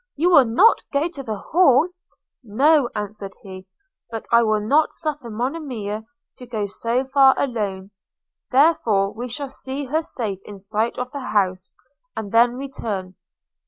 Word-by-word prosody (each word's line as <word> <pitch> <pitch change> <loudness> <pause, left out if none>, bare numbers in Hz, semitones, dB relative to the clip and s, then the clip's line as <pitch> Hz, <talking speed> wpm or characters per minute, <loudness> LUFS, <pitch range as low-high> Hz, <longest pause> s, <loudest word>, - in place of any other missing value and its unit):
You 340 +5 +2
will 285 -7 +7
not 300 - +4
go 285 +3 +1
to 315 -5 -8
the 220 -5 -4
Hall?' 320 - +3 0.3
– - - -65
'No,' 270 +5 +3
answered 210 -1 -5
he; 190 -1 -10 0.4
'but 225 -1 -6
I 235 0 +6
will 215 -2 +2
not 285 +9 +2
suffer 300 -6 -4
Monimia 230 -4 -4 0.3
to 250 - -11
go 220 -4 -2
so 235 +6 -2
far 270 0 +5
alone; 205 -7 -3 0.6
therefore 240 -9 +3
we 245 +3 -6
will 280 - -4
see 270 +1 -5
her 305 +5 0
safe 220 - -4
in 205 - -10
sight 215 +4 -2
of 250 0 -4
the 285 - -5
house, 190 -7 -1 0.4
and 205 -3 -5
then 235 +1 +4
return.' 220 -8 -5
235 Hz, 160 wpm, -22 LUFS, 210-275 Hz, 0.6 s, will